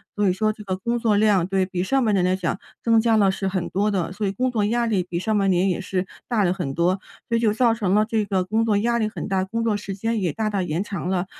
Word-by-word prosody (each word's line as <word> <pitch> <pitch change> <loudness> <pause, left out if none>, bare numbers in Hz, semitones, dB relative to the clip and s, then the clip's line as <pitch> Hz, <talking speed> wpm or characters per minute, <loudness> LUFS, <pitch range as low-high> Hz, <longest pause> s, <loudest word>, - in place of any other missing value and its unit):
所 205 -2 +2
以 - - +3
说 215 +3 0
这 210 - -11
个 185 -2 -3
工 235 +5 -1
作 215 -3 +2
量， 205 -5 +3
对 190 -1 +1
比 180 -1 -3
上 260 +5 +1
半 215 - +2
年 185 -2 +2
来 185 +1 +2
讲 185 +1 -2 0.2
增 230 -1 +4
加 225 -1 +3
了 195 -2 +4
是 195 0 -3
很 185 -2 -2
多 205 +3 +1
的， 185 -5 -1
所 200 +2 -2
以 195 - 0
工 255 +5 -1
作 220 -3 0
压 235 +2 +1
力 205 -5 +1
比 175 -1 -5
上 215 +4 -1
半 195 -1 +2
年 185 +1 +2
也 185 +1 -1
是 185 -1 -2 0.2
大 225 -4 +1
了 180 0 +2
很 135 -7 -3
多， 180 +3 +1 0.3
所 230 - 0
以 - - +2
就 225 -2 +2
造 230 +1 +3
成 200 -4 0
了 215 - +4
这 220 -1 0
个 190 -2 0
工 220 +4 0
作 215 -3 +2
压 235 +3 +1
力 215 - +1
很 - - -6
大， 190 -2 0
工 230 +4 -3
作 225 -2 +1
时 200 -1 -5
间 225 +1 -1
也 175 -4 0
大 215 +5 -2
大 200 - 0
延 175 0 -1
长 195 -3 -4
了。 185 -1 0
205 Hz, 325 characters per minute, -23 LUFS, 185-220 Hz, 0.3 s, 增